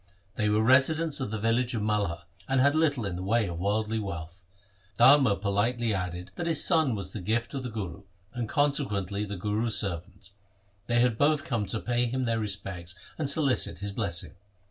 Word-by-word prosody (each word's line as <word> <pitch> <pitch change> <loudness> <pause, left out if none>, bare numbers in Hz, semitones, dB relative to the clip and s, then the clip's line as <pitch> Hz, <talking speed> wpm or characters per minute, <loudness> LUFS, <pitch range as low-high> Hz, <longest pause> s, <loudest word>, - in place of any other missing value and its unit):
They 105 -1 +1
were 105 +1 +2
residents 140 +6 +3
of 130 - -2
the 110 - -3
village 115 +3 0
of 110 - -2
Malha, 105 -6 -1 0.3
and 135 0 +2
had 140 +2 +4
little 145 -7 +1
in 90 -3 -3
the - - -5
way 110 +4 +1
of 85 -1 -5
worldly 110 +3 0
wealth. 85 -2 -7 0.5
Dharma 135 -6 +6
politely 110 +4 0
added 90 -1 -4
that 175 - -3
his 165 - +2
son 160 -9 +3
was 95 -2 -5
the 105 - -6
gift 115 +5 -1
of 135 - -3
the 125 - -5
Guru 100 -5 -6 0.3
and 120 -3 -4
consequently 105 - 0
the 100 -1 -6
Guru's 105 +4 0
servant. 95 +1 -4 0.6
They 120 0 +3
had 120 -3 +1
both 150 0 +3
come 115 -6 -1
to 110 - -2
pay 120 +1 0
him 130 +2 -2
their 115 -1 0
respects 95 -4 -4 0.2
and 145 -3 0
solicit 140 - +1
his 100 +2 -4
blessing. 100 -5 -2
110 Hz, 190 wpm, -28 LUFS, 100-130 Hz, 0.6 s, Dharma